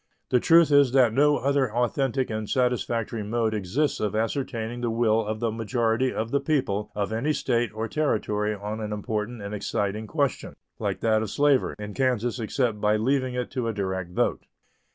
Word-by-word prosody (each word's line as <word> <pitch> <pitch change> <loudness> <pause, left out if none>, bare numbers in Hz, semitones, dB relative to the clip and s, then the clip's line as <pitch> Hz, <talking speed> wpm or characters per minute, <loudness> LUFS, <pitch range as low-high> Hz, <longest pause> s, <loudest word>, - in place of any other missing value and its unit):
The 125 - +4
truth 165 +3 +5
is 140 -3 +5
that 125 -4 +5
no 145 +3 +4
other 140 -3 +1
authentic 125 +2 0
and 110 -1 -4
satisfactory 120 -3 0
mode 110 +1 -1
exists 110 +9 -1
of 105 0 -1
ascertaining 115 0 -2
the 120 - 0
will 115 -1 +2
of 110 +2 -4
a 115 - +1
majority 115 +2 0
of 115 +1 -3
the 140 - +2
people 115 -10 -1
of 105 +1 -2
any 140 +8 0
State 120 -5 0
or 110 +1 -3
Territory 105 -7 0
on 105 +2 -5
an 105 -1 -4
important 105 +2 -3
and 100 +1 -5
exciting 105 +1 -2
question 140 +1 -1 0.2
like - - -2
that 110 -1 +2
of 110 - -3
slavery 140 +2 +2
in 105 0 -7
Kansas 125 -2 0
except 115 -1 -1
by 105 0 +3
leaving 130 +3 0
it 125 0 -3
to 125 -3 -2
a 115 - -1
direct 95 -3 -3
vote. 90 - -1
115 Hz, 185 wpm, -26 LUFS, 105-130 Hz, 0.2 s, truth